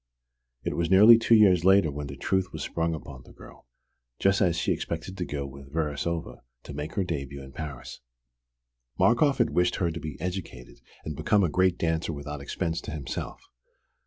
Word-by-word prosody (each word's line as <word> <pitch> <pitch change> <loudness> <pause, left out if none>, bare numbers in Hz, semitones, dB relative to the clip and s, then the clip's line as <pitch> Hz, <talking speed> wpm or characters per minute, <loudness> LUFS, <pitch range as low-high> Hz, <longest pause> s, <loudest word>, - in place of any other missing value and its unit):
It - - -2
was 85 -1 -1
nearly 105 +5 +8
two 115 0 +4
years 95 -6 +5
later 95 -4 +5
when 75 0 -5
the 70 0 -8
truth 95 +4 -1
was - - -5
sprung 80 -1 -1
upon 70 -3 -10
the - - -17
girl, - - -15 0.5
just 95 0 +2
as 85 -2 +2
she 80 - 0
expected 85 +3 -4
to 90 -2 -3
go 70 -3 -4
with 70 0 -11
Verasova 80 +2 -3 0.2
to - - -9
make 75 +3 -6
her 100 - +1
début 70 -5 -4
in 65 - -11
Paris. 70 -5 -7 1.0
Markoff 135 +4 +3
had - - +2
wished 90 0 +2
her 85 -2 0
to 80 - -6
be 75 -3 -7
educated 90 -8 -6 0.3
and 75 - -4
become 100 +8 +2
a 90 - +2
great 95 +2 +2
dancer 80 0 -1
without 75 0 -6
expense 80 +3 -3
to - - -7
himself. 75 -4 -6
80 Hz, 190 wpm, -27 LUFS, 75-95 Hz, 1.0 s, nearly